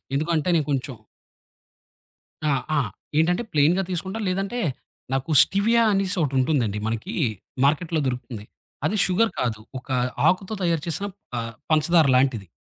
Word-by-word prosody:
ఎందుకు 155 +4 -1
అంటే, 155 +3 0
నే 160 - +3
కొంచెం 135 -2 -2 1.5
ఆ! - - +3 0.3
ఆ! - - +4 0.4
ఏంటంటే, 175 +7 +2
ప్లెయిన్‌గా 160 +6 +3
తీసుకుంటా, 190 +4 -3
లేదంటే 195 +6 -2 0.5
నాకు 135 +5 -1
స్టివియా 230 +4 +2
అనేసొకటిటుంటుందండి. 140 - +1
మనకీ 115 0 -3 0.5
మార్కెట్‌లో 155 +3 +1
దొరుకుతుంది. 125 -4 -4 0.4
అది 215 - 0
షుగర్ 220 +5 +2
కాదు. 110 -3 -1 0.2
ఒక 125 - -15 0.4
ఆకుతో 190 +3 0
తయారు 165 -3 +1
చేసిన 195 +5 -1 0.3
ఆహ్, 115 0 -4 0.2
పంచదార 155 0 +4
లాంటిది. 125 -7 +1
160 Hz, 125 wpm, -24 LUFS, 130-185 Hz, 1.5 s, ఆ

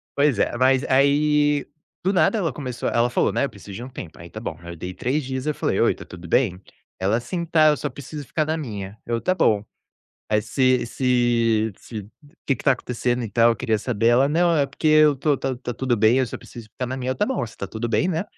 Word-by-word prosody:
pois 140 -5 +3
é, - - +1
mas 130 +1 +3
aí, 145 +2 +3 0.4
do 190 - +1
nada, 220 +4 +3
ela 165 -9 -1
começou 125 -4 -4
ela 120 +1 +2
falou, - - +1
né: - - +1
"Eu - - -4
preciso 100 -2 -12
de 115 +5 -6
um 130 - -8
tempo." 85 -9 -9
Aí 85 +1 -10
tá 110 - -8
bom. 100 -8 -5
Aí 85 0 -8
eu - - -10
dei 90 +3 -6
3 130 +10 -1
dias, 130 +2 -4
aí 150 - +3
eu - - -7
falei: - - -1
"Oi, - - +3
tá - - -11
tudo 85 -1 -11
bem?" 95 -4 +1 0.4
Ela: 100 +5 +1
"Sim, 170 +9 -4
tá, 155 -2 +5
eu 150 - +2
só - - -3
preciso 145 +1 -8
ficar 155 -2 0
na 155 - -1
minha." 105 -8 -6
Eu: 115 -1 0
"Tá 185 +9 +1
bom." 105 - +2 0.6
Aí, 105 0 +2
se 130 +2 +1
se 115 -3 +1
se 105 -4 -8 0.4
que 135 - +3
que 115 - -10
tá 135 - +6
acontecendo, 125 -1 -2
e - - -4
tal? 115 +3 +4
Eu 115 - 0
queria 110 0 0
saber. 115 -1 -1
Ela: 130 +4 +4
"Não, 170 +2 +3
é 145 - +3
porque 140 +3 -5
eu 155 -2 +6
tô 145 +2 +1
tá 135 -1 -3
tá 125 -1 -5
tudo 125 0 0
bem, 110 +4 +4
eu 130 - +2
só - - -7
preciso 115 -2 -12
ficar 125 - -4
na 130 +2 -4
minha." 130 0 -3
Eu: 130 - -2
"Tá 210 - +1
bom, 260 - -1
se 115 - -11
tá 100 - -5
tudo 110 +4 -4
bem, 150 - +1
né?" 170 +1 -1
125 Hz, 260 wpm, -23 LUFS, 115-145 Hz, 0.6 s, tá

